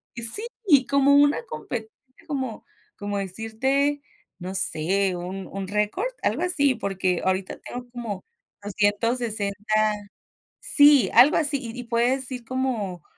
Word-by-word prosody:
Sí, 290 - +3
como 280 0 +4
una 290 +10 +3
compe 225 - -6 0.4
como 260 -7 -4 0.3
como 205 0 -4
decirte, 240 +9 -1 0.4
no 185 +2 -6
sé, 185 +4 +1
un 185 +2 -6
un 195 -1 -6
récord, 210 - -1
algo 240 +10 -1
así. 285 -7 +2
Porque 190 -4 -2
ahorita 190 0 -2
tengo 245 0 -8
como 225 -6 -6 0.4
260 210 0 -1 0.9
sí, 290 -2 +5
algo 275 +5 +6
así. 290 -2 +4 0.2
Y 250 - -9
y - - -5
puedes 245 +3 0
ir 245 -2 -6
como 225 - -3
230 Hz, 125 wpm, -24 LUFS, 200-275 Hz, 0.9 s, algo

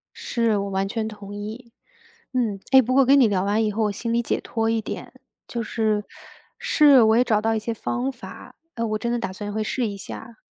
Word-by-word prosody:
是， 230 -3 0
我 200 0 -2
完 195 0 -1
全 220 +1 -2
同 205 -2 -9
意。 220 +4 -7 0.6
嗯， 220 -6 0
哎， 265 - +8
不 255 +1 -1
过 275 - +6
我 - - +4
跟 275 +2 +6
你 250 - +6
聊 190 -3 0
完 205 +3 +1
以 215 - 0
后， 220 +2 -1
我 210 - +1
心 230 +3 -3
里 235 - +2
解 - - -1
脱 225 -1 -1
一 225 0 +1
点， - - -7 0.3
就 235 -1 -3
是 215 -2 0 0.6
是， 285 -4 +6
我 220 +1 +4
也 245 - +5
找 215 -4 +1
到 225 +1 +1
一 220 - 0
些 230 +2 -3
方 250 +4 -2
法， 255 - -11 0.2
呃， 230 0 -1
我 215 -1 -1
真 235 +2 -2
的 240 - 0
打 230 - -3
算 205 0 -6
会 215 +1 -1
试 240 +1 -1
一 200 -1 -5
下。 225 +3 -9
225 Hz, 255 characters per minute, -23 LUFS, 210-240 Hz, 0.6 s, 哎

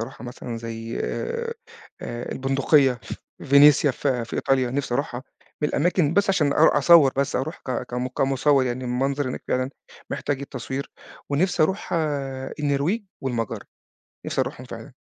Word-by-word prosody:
أروحها 115 +1 -7
مثلًا 120 -1 -6
زي، 115 0 -5
آآ، 470 0 -3 0.5
البندقية، 135 +2 +1 0.4
فينيسيا 145 +1 +6
في 130 -2 -1
في 115 - -6
إيطاليا 130 -2 +1
نفسي 130 -2 -2
أروحها، 130 -3 -2 0.4
من 150 - +3
الأماكن 165 0 +1
بس 200 +1 +3
عشان 150 -7 +2
أرو 160 - +6
أصوّر 150 -2 +6
بس، 140 0 0
أروح 150 +6 -3
ك 130 -2 -1
كم 125 +1 -3
كمصوّر 135 +1 +2
يعني 125 +1 -3
المنظر 135 +3 -1
هناك 125 - -5
فعلًا 130 +1 0 0.4
محتاج 145 -2 -2
التصوير، 135 0 -5 0.4
ونفسي 170 +3 +2
أروح 190 +6 -1 0.7
النرويج 150 +9 0 0.2
والمجر، 120 -5 -3 0.6
نفسي - - 0
أروحهم - - -5
فعلًا. - - -9
135 Hz, 140 wpm, -24 LUFS, 125-150 Hz, 0.7 s, فينيسيا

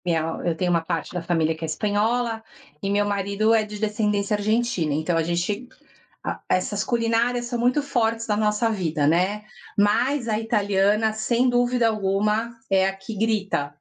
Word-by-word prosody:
minha 165 -2 +1 0.2
eu 170 -2 0
tenho 180 +1 0
uma 170 -1 +3
parte 165 +1 -4
da 180 -2 -3
família 165 -2 +1
que 160 +1 -7
é - - 0
espanhola 220 +6 0 0.4
e 195 - -1
meu 205 0 +2
marido 200 +2 +1
é 220 - +4
de 210 0 -8
descendência 210 -1 0
Argentina. 210 -7 0
Então 160 +2 0
a - - +2
gente 175 +8 -2 0.6
a - - -3
essas 200 +3 0
culinárias 235 +1 +1
são 240 0 -3
muito 250 +5 +2
fortes 230 -5 -1
na 210 - +1
nossa 215 +2 +1
vida, 165 -8 -1
né. 185 +6 +1 0.3
Mas 235 +5 +2
a 215 - +1
italiana, 210 0 +1
sem 235 +3 +1
dúvida 245 -1 +2
alguma 210 +2 0 0.2
é 190 0 +3
a 195 - -2
que 195 +3 -8
grita. 205 -9 0
210 Hz, 175 wpm, -24 LUFS, 190-230 Hz, 0.6 s, é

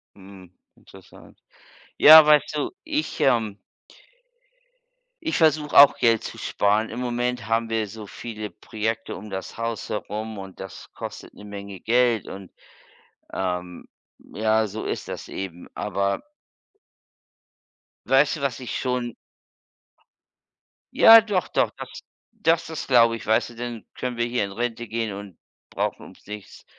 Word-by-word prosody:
Mhm, 95 -2 -14 0.3
interessant. - - -17 0.6
Ja, 155 +1 +10
weißt 150 0 +4
du, 150 - -2
ich 310 -1 -3
ähm 110 -6 +2 1.6
ich 320 - -1
versuche 155 -2 +2
auch 140 0 +9
Geld 115 -2 +3
zu - - -7
sparen. 105 +2 0
Im 120 - -6
Moment 120 -2 -2
haben 115 0 0
wir 110 -2 -1
so 110 +1 -9
viele 110 -1 -7
Projekte 110 +1 -4
um 105 +2 -9
das 95 0 -6
Haus 115 -1 -4
herum 110 0 -4
und 95 -1 -10
das 95 - -10
kostet - - -8
'ne 105 - -14
Menge 100 -2 -8
Geld 120 -2 +2
und 95 -1 -9 0.8
ähm, 90 -1 -4 0.5
ja, 110 +1 +2
so 110 +3 -6
ist - - -4
das - - -7
eben, 90 -2 -7
aber 100 - -1 1.9
weißt 140 +4 +4
du, - - -9
was 135 -4 -2
ich 125 - -4
schon 125 -2 -2 1.8
Ja 225 0 +9
doch, 205 -4 -1
doch. - - +1
Das - - -9 0.4
das 165 -6 +1
ist 160 -2 -6
glaube 115 -3 +5
ich 115 - -9
weißt 110 +2 +2
du, 120 - -14
dann 120 -2 -6
können 125 -1 -4
wir 120 - +1
hier 120 -3 -1
in 100 - -8
Rente 120 +2 -3
gehen 115 -2 -2
und 100 -3 -9 0.3
brauchen - - -3
ums - - -16
nichts 105 -1 -10
115 Hz, 145 wpm, -24 LUFS, 105-125 Hz, 1.9 s, Ja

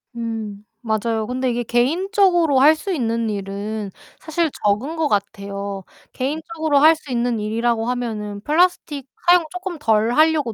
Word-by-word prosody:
음. 220 -3 -5 0.4
맞아요. 220 -2 -1
근데 255 +1 -1
이게 240 0 -2
개인적으로 335 - +2
할 300 +4 +7
수 370 +5 -4
있는 230 -5 -1
일은 200 +1 -4 0.3
사실 320 0 -1
적은 220 +11 0
것 320 -2 +1
같아요. 200 -1 -3 0.3
개인적으로 315 +2 -1
할 315 +2 +7
수 300 -3 -11
있는 240 -1 0
일이라고 225 +2 0
하면은 215 -5 -3
플라스틱 305 -2 +1 0.2
사용을 350 -2 +6
쪼끔 360 -2 -5
덜 225 -4 +2
하려고 310 -6 +3
245 Hz, 320 characters per minute, -21 LUFS, 215-315 Hz, 0.4 s, 할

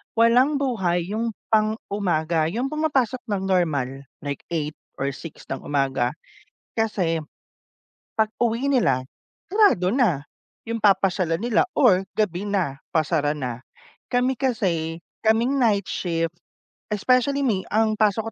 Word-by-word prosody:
Walang 245 +6 +4
buhay 190 -10 0
yung 225 0 -2 0.2
pang-umaga, 195 -7 +1
yung 245 - -2
pumapasok 275 -6 +1
nang 200 -2 -1
normal 140 -8 0 0.2
like 140 -1 -3
8 155 -3 -2 0.2
or 140 +1 -1
6 160 +3 -10
ng - - -2
umaga, 135 -3 +1 0.6
kasi, 190 -7 0 1.0
pag-uwi 230 +4 0
nila, 230 - +3 0.5
sarado 400 - +4
na, 220 - +2 0.5
yung 230 - -1
papasyalan 190 -4 +3
nila 235 -1 +2
or 195 -9 +4
gabi 205 -2 0
na, 180 -9 -1 0.2
pasara 155 -1 +2
na. 125 -4 -4 0.5
Kami 250 +1 +1
kasi, 170 -10 -1 0.2
kaming 230 +5 +3
night 210 -5 +3
shift, 165 -2 -1 0.6
especially 255 +6 +2
me, 195 -6 0
ang 220 0 +3
pasok 215 +1 +2
200 Hz, 120 wpm, -24 LUFS, 165-235 Hz, 1.0 s, Walang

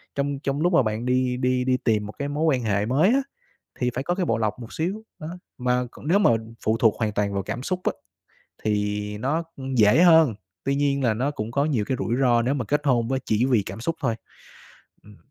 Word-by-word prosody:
Trong 140 0 -1
trong 140 +1 -2
lúc 175 +1 +2
mà 135 - +5
bạn 110 +2 -2
đi 125 0 +1
đi 125 -1 +1
đi 130 0 +2
tìm 105 -3 +2
một 105 - -8
cái 140 - -2
mối 150 +2 -2
quan 135 -6 +2
hệ 100 -1 +1
mới 145 - +3
á, 270 +3 +3 0.6
thì 125 -1 +1
phải 130 - -2
có 175 +4 -1
cái 185 -2 -1
bộ 115 - +1
lọc 110 +2 -1
một 120 0 -9
xíu, 190 +7 -3 0.2
đó, 155 - -6 0.3
mà 125 0 +1
còn 145 - -11
nếu 195 +5 +4
mà 195 - +5 0.3
phụ 110 +1 +2
thuộc 115 -2 +3
hoàn 110 -1 0
toàn 100 -1 -1
vào 100 -1 -1
cảm 115 +4 -5
xúc 185 +3 -2
á, - - +3 0.7
thì 105 0 -1
nó, 145 +9 -1
ư, 135 - -8
dễ 110 +9 +5
hơn, 160 - +6 0.3
tuy 135 0 +1
nhiên 140 -1 +1
là 115 -3 +3
nó 130 +6 -1
cũng 110 -4 -5
có 140 +3 +1
nhiều 120 -9 0
cái 130 - -1
rủi 115 - -1
ro 120 -2 +4
nếu 130 +4 0
mà 130 -6 -2
kết 145 +4 0
hôn 120 -4 +2
với 130 0 0
chỉ 110 +3 +2
vì 120 -7 +2
cảm 100 +3 -7
xúc 165 +6 -1
thôi. 115 -5 0 0.9
Ừm. 105 0 -16
125 Hz, 245 wpm, -24 LUFS, 110-145 Hz, 0.9 s, hơn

